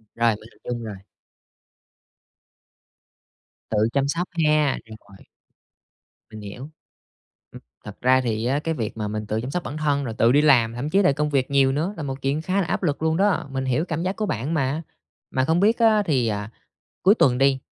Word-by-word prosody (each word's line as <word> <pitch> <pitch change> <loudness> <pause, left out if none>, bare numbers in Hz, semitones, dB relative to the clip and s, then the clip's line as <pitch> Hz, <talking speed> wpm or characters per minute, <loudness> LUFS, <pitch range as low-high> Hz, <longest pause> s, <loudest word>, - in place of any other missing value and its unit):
Rồi, 115 -2 +2
mình 110 +2 -14
hình - - -26
dung 120 -1 -4
rồi. 105 -3 -6 2.7
Tự 110 - -1 0.2
chăm 140 0 +1
sóc 170 +5 -1 0.2
ha, 150 -2 +3
rồi. 100 -3 -15 1.0
Mình 110 -1 -10
hiểu. 120 +8 -8 0.8
Ừm, - - -11 0.2
thật 105 -1 -10
ra 130 +1 +4
thì 115 -2 -2
á, 135 +4 +1
cái 165 +1 -2
việc 115 -6 -4
mà 105 -1 -2
mình 105 0 -4
tự 110 +1 -1
chăm 130 - -5
sóc 180 +2 -2
bản 150 - -6
thân 145 -2 0
rồi 115 - -4
tự 115 - +4
đi 145 +3 +5
làm, 120 -7 +4
thậm 130 +5 -4
chí 195 +4 +3
là 180 - +4
công 150 +2 -1
việc 140 -2 0
nhiều 135 -1 +4
nữa 165 +8 -1
là 160 - -5
một 135 -1 -5
chuyện 140 +3 -1
khá 190 +4 0
là 175 - -2
áp - - -2
lực 150 -4 -1
luôn 160 0 +1
đó. 195 -5 +1
Mình 135 0 -3
hiểu 130 +6 0
cảm 165 -1 -3
giác 185 +2 -2
của 215 - -2
bạn 140 - -2
mà. 145 0 0 0.5
Mà 130 0 +1
không 165 +4 +2
biết 220 +5 +3
á, 220 -2 +4
thì 130 -7 +1
à, 105 0 -3 0.5
cuối 195 +3 +6
tuần 125 - +3
đi, 135 0 +3
135 Hz, 210 wpm, -23 LUFS, 115-160 Hz, 2.7 s, cuối